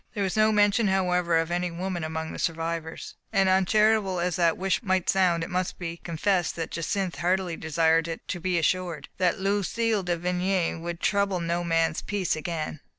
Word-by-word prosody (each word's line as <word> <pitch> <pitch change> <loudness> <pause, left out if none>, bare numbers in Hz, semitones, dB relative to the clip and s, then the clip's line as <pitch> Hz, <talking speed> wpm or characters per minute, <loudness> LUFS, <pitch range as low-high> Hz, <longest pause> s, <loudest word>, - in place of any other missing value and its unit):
There 205 - 0
was 190 +1 -1
no 215 0 +4
mention, 210 +1 +3
however, 180 -3 +2
of 165 +1 0
any 175 +1 0
woman 175 0 -4
among 160 0 -4
the - - -7
survivors: 165 0 -3 0.2
and, 195 -1 +3
uncharitable 195 0 +3
as 175 0 -1
the 170 -2 +3
wish 190 0 0
might 190 -5 0
sound, 180 -3 +2
it 165 - -5
must 180 0 -2
be 170 -1 -5
confessed 175 +1 -1
that 165 -1 -4
Jacynth 180 +2 -2
heartily 180 -1 0
desired 165 +1 +1
to 180 - -3
be 180 0 0
assured 170 -2 -1
that 180 -1 +2
Lu 200 +1 +1
cille 225 +1 0
de 175 -1 -1
Vigny 180 +1 0
would 170 +1 -6
trouble 200 -2 +1
no 170 +1 -1
man's 165 -2 +1
peace 195 -5 -1
again. 155 -1 -4
180 Hz, 185 wpm, -26 LUFS, 165-190 Hz, 0.2 s, no